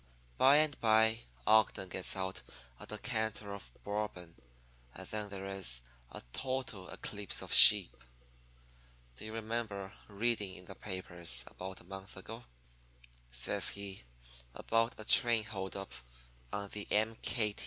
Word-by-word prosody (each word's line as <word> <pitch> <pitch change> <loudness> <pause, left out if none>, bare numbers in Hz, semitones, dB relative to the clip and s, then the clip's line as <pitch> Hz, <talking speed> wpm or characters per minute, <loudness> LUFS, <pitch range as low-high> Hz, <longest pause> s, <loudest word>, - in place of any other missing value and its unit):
"By 135 +2 +6
and 155 -2 +1
by 110 0 +3 0.2
Ogden 110 -3 +3
gets 95 0 -1
out 95 0 -3 0.4
a - - -10
decanter 110 -2 -4
of 100 -12 -10
Bourbon, 100 -5 -5 0.6
and - - -8
then 105 -1 -4
there 95 -1 -7
is 95 -12 -2 0.3
a - - -8
total 130 -8 -4
eclipse 105 -2 -5
of - - -3
sheep. - - +10 1.2
"'Do 105 - -10
you 110 - -7
remember 110 -3 -4
reading 105 -2 -2
in 90 - -13
the 95 - -9
papers, 85 -10 -3
about 95 +1 -9
a - - -19
month 95 +2 -10
ago,' 115 +5 -9 0.8
says - - +4
he, 100 -1 -6 0.5
'about 115 +2 0
a 110 - -7
train 115 0 +5
hold 95 -3 -6
up 95 0 -7 0.6
on 100 0 -4
the 105 0 -8
M. 110 +2 +1
100 Hz, 135 wpm, -33 LUFS, 95-110 Hz, 1.2 s, sheep